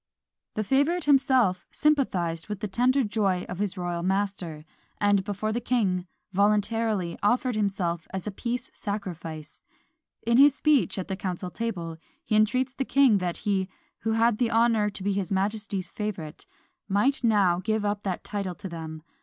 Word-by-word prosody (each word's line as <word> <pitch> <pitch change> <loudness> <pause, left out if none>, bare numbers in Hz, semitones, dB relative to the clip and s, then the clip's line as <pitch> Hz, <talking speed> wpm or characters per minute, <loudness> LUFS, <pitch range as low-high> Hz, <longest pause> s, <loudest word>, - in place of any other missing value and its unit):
The 215 - 0
favourite 285 - +2
himself 260 -9 +3
sympathised 190 - +1
with 210 -2 -4
the 210 - -3
tender 250 +7 +2
joy 200 -4 0
of 180 - -6
his 205 -2 -1
royal 175 -1 -2
master; 185 -4 -2 0.3
and, 205 -1 +3
before 205 +2 -2
the 240 - -1
king, 195 -7 0 0.2
voluntarily 205 -2 +1
offered 245 +3 +2
himself 190 -5 -1
as 190 -1 -4
a 210 - -3
peace 240 +5 -4
sacrifice. 170 -7 -6 0.6
In 235 +1 +3
his 280 0 +7
speech 300 -8 +2
at 190 - -3
the 190 - -2
council 180 -1 -4
table, 175 -8 -4 0.3
he 215 - 0
entreats 255 +5 +2
the 270 - -2
king 265 -6 +4
that 180 -2 -2
he, 195 -2 +1 0.3
who 225 - -1
had 225 -1 +3
the 240 -2 +2
honour 225 -2 +3
to 200 -2 -6
be 200 0 +1
his 195 -2 -2
majesty's 200 -1 -1
favourite, 185 -7 -5 0.4
might 230 +8 +2
now 200 -6 +3
give 215 +2 -1
up 205 0 -1
that 190 -3 -3
title 200 -3 -3
to 190 - -7
them. 160 -2 -7
205 Hz, 165 wpm, -27 LUFS, 185-230 Hz, 0.6 s, his